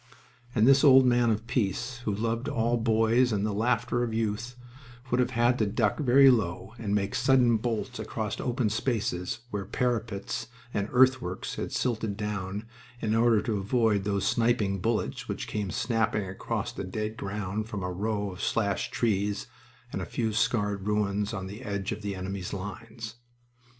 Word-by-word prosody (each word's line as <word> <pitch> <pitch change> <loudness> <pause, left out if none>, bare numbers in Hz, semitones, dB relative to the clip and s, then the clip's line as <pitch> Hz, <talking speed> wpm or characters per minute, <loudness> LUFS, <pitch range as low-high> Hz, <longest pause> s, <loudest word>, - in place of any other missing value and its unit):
And 110 0 +4
this 135 +1 +6
old 135 -2 +8
man 120 -1 +4
of 110 0 0
peace, 120 +3 -1
who 105 - +1
loved 115 +4 -1
all 115 +1 +1
boys 115 +2 +3
and 105 -1 0
the 105 - -1
laughter 120 +3 +1
of 115 -2 -1
youth, 115 +2 -2 0.6
would 125 - +2
have 125 -1 +3
had 120 0 +2
to 110 - +2
duck 105 +3 +1
very 135 -1 +7
low 95 -3 -1
and 105 -3 -1
make 100 -1 0
sudden 125 -3 +4
bolts 120 +2 -3
across 110 -2 -3
open 120 -3 0
spaces, 110 -2 -1
where 105 -1 -2
parapets 110 -2 -2 0.3
and 100 +1 -1
earthworks 130 -7 +2
had - - -4
silted 110 -4 -1
down, 105 0 -3 0.3
in 110 -2 0
order 115 -1 +4
to 110 -4 -1
avoid 105 -1 +2
those 100 -1 0
sniping 115 -4 +2
bullets 105 - -1
which - - -3
came 105 -3 -2
snapping 110 -1 0
across 95 0 -3
the - - -5
dead 105 +3 -3
ground 105 +1 -4
from 105 -4 -4
a 90 - -2
row 100 +1 -2
of 90 - -9
slashed 100 -4 0
trees 105 -3 0 0.5
and - - -2
a - - -3
few 110 -2 -2
scarred 105 -3 0
ruins 105 -1 0
on 95 -4 -4
the 100 +5 -8
edge 100 -4 -3
of 105 -1 -4
the 100 -1 -3
enemy's 95 0 -5
lines. 110 +4 -7
110 Hz, 170 wpm, -28 LUFS, 100-120 Hz, 0.6 s, old